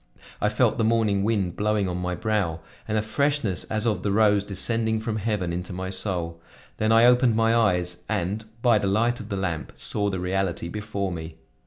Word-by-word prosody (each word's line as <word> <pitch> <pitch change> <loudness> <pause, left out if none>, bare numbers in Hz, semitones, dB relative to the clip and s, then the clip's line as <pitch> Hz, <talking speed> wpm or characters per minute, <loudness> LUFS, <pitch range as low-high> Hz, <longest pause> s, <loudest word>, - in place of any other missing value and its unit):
I 105 - +3
felt 115 +3 +1
the - - +3
morning 110 -3 +2
wind 100 -5 0
blowing 105 -1 +1
on 90 -1 -3
my 90 0 -2
brow 95 -6 -1 0.3
and 110 0 0
a 105 - +1
freshness 140 -4 0
as 110 +1 -1
of 110 -2 0
the 100 - -1
rose 105 -1 +4
descending 110 +3 +1
from 110 0 -3
heaven 100 -5 -1
into 90 +2 -4
my 95 +1 -4
soul. 85 -4 -3 0.4
Then 110 +1 +1
I 115 +1 +6
opened 125 -1 +5
my 115 0 +3
eyes 90 -6 +1
and, 105 +1 -2 0.2
by 120 -4 +5
the 100 - -1
light 115 +5 +1
of 110 - -8
the 100 - -2
lamp, 85 -5 -3
saw 100 -1 -2
the 95 -2 -3
reality 90 -2 -1
before 100 -1 -3
me. 80 -2 -6
105 Hz, 200 wpm, -25 LUFS, 90-110 Hz, 0.4 s, I